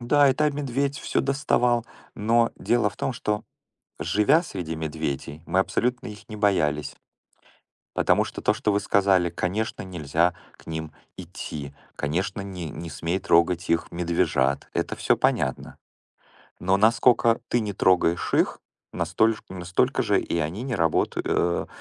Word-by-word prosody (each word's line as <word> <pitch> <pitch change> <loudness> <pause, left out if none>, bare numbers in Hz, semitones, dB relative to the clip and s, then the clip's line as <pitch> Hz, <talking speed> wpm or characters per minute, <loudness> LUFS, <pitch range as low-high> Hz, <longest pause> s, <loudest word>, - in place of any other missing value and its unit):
Да, 140 +4 +4
и 130 - +3
там 150 -1 +1
медведь 140 0 -1
всё - - 0
доставал. 125 -4 +1 0.3
Но 115 +2 +2
дело 120 -3 +1
в - - -17
том, 135 - -2
что, 105 -2 -2 0.6
живя 135 - +3
среди 90 - -5
медведей, 80 -1 -4
мы 95 - +1
абсолютно 125 +5 0
их 105 0 -10
не 110 - -6
боялись. 75 -8 +1 1.0
Потому - - +3
что - - -7
то, - - +3
что 105 - 0
вы 100 - +2
сказали: 95 -3 +3
"Конечно, 95 +6 -2
нельзя 85 -1 0 0.2
к - - -20
ним 80 -1 -5 0.3
идти. 70 -2 -7 0.2
Конечно, 90 +7 -2
не 90 -4 -6
не 85 +3 -7
смей 85 +5 -2
трогать 85 0 +2
их 85 0 +1
медвежат". 85 -6 0
Это - - -2
всё - - +2
понятно. 65 - -1 0.8
Но 95 +2 +2
наскока 115 +2 +4
ты 120 - +2
не 105 -2 -3
трогаешь 90 -3 +2
их, - - +2 0.3
настоль 90 +7 +2
ж - - -12
настолько 90 -1 0
же - - +2
и 85 - -2
они 85 +8 -2
не 130 -1 -3
работают, 80 -5 0
э 85 0 +1
95 Hz, 150 wpm, -25 LUFS, 80-115 Hz, 1.0 s, Да